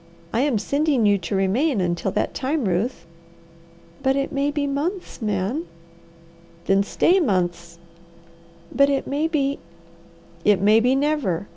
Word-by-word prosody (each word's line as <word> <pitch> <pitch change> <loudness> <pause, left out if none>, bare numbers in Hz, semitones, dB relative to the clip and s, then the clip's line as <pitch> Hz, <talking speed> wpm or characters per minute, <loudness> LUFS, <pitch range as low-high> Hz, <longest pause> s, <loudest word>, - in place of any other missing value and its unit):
I 230 - +1
am 275 -5 +1
sending 280 +1 +1
you 205 -1 +3
to 170 +3 -4
remain 215 +8 +1
until 175 +1 -1
that - - -1
time, 280 0 -1
Ruth." 185 +1 -1 1.0
"But 265 0 +2
it 275 0 -1
may 280 +1 0
be 290 -1 -1
months, 300 +5 -3
Man!" 210 - -2 1.0
"Then 195 0 +3
stay 345 - +2
months." 175 - -1 1.0
"But 280 0 +5
it 275 -1 0
may 295 +3 -1
be 280 -3 -1 0.4
" 170 0 -27
"It 205 -2 +4
may 210 +3 +5
be 250 +3 +2
never! 270 - 0
245 Hz, 145 wpm, -22 LUFS, 195-285 Hz, 1.0 s, But